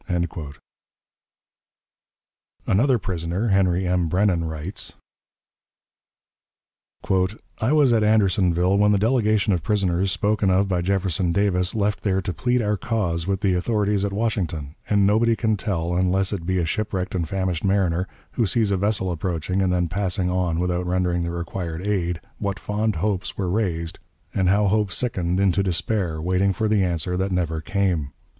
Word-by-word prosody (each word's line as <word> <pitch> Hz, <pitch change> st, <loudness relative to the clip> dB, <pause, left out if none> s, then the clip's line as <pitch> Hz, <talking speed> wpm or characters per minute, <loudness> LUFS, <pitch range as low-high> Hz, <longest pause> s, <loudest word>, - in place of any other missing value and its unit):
Another 125 Hz, +6 st, +3 dB
prisoner, 90 Hz, +2 st, -2 dB
Henry 95 Hz, -2 st, +2 dB
M. 90 Hz, -1 st, +1 dB
Brennan, 90 Hz, -2 st, +2 dB
writes: 80 Hz, +4 st, -5 dB, 2.7 s
"I 110 Hz, +5 st, +1 dB
was 145 Hz, -5 st, +4 dB
at 110 Hz, -2 st, +3 dB
Andersonville 95 Hz, -3 st, +3 dB
when 105 Hz, 0 st, +4 dB
the -, -, +3 dB
delegation 110 Hz, -2 st, +2 dB
of 85 Hz, -, 0 dB
prisoners 95 Hz, -3 st, +1 dB
spoken 105 Hz, -1 st, +1 dB
of 95 Hz, +2 st, +3 dB
by 90 Hz, -2 st, 0 dB
Jefferson 95 Hz, -1 st, 0 dB
Davis 90 Hz, -1 st, +1 dB
left 100 Hz, -1 st, 0 dB
there 95 Hz, -2 st, +1 dB
to 95 Hz, -1 st, -3 dB
plead 125 Hz, +8 st, 0 dB
our 105 Hz, 0 st, 0 dB
cause 90 Hz, -5 st, -1 dB
with 100 Hz, 0 st, -1 dB
the 100 Hz, -3 st, +2 dB
authorities 100 Hz, +1 st, 0 dB
at 100 Hz, -, -1 dB
Washington; 90 Hz, -9 st, -2 dB, 0.2 s
and 100 Hz, -2 st, +3 dB
nobody 115 Hz, +3 st, +3 dB
can 110 Hz, -1 st, +1 dB
tell, 90 Hz, -4 st, -2 dB
unless 95 Hz, +2 st, +1 dB
it 85 Hz, -4 st, -5 dB
be 95 Hz, 0 st, +1 dB
a 85 Hz, -, +1 dB
shipwrecked 95 Hz, 0 st, -2 dB
and 85 Hz, -4 st, -2 dB
famished 95 Hz, -4 st, -2 dB
mariner, 95 Hz, -2 st, +1 dB, 0.2 s
who 115 Hz, -, 0 dB
sees 105 Hz, +1 st, +1 dB
a 100 Hz, -, +2 dB
vessel 100 Hz, -1 st, 0 dB
approaching 90 Hz, +2 st, -2 dB
and 95 Hz, -1 st, +1 dB
then 90 Hz, -1 st, +1 dB
passing 90 Hz, 0 st, -1 dB
on 90 Hz, -3 st, 0 dB
without 90 Hz, 0 st, -1 dB
rendering 90 Hz, -1 st, 0 dB
the 85 Hz, -, -2 dB
required 85 Hz, 0 st, -4 dB
aid, 90 Hz, -5 st, -1 dB, 0.2 s
what 100 Hz, -2 st, -2 dB
fond 105 Hz, +3 st, -1 dB
hopes 95 Hz, +3 st, -2 dB
were 95 Hz, -3 st, -1 dB
raised, 85 Hz, -6 st, -2 dB, 0.3 s
and 95 Hz, -2 st, +2 dB
how 105 Hz, +2 st, +3 dB
hope 105 Hz, 0 st, +1 dB
sickened 90 Hz, -6 st, -1 dB
into 100 Hz, -1 st, +2 dB
despair, 95 Hz, -2 st, -1 dB
waiting 90 Hz, +4 st, +1 dB
for 110 Hz, +4 st, -1 dB
the 105 Hz, -2 st, +2 dB
answer 90 Hz, 0 st, -1 dB
that 95 Hz, +2 st, -1 dB
never 85 Hz, -3 st, -1 dB
came. 90 Hz, -6 st, -1 dB
95 Hz, 160 wpm, -23 LUFS, 90-105 Hz, 2.7 s, was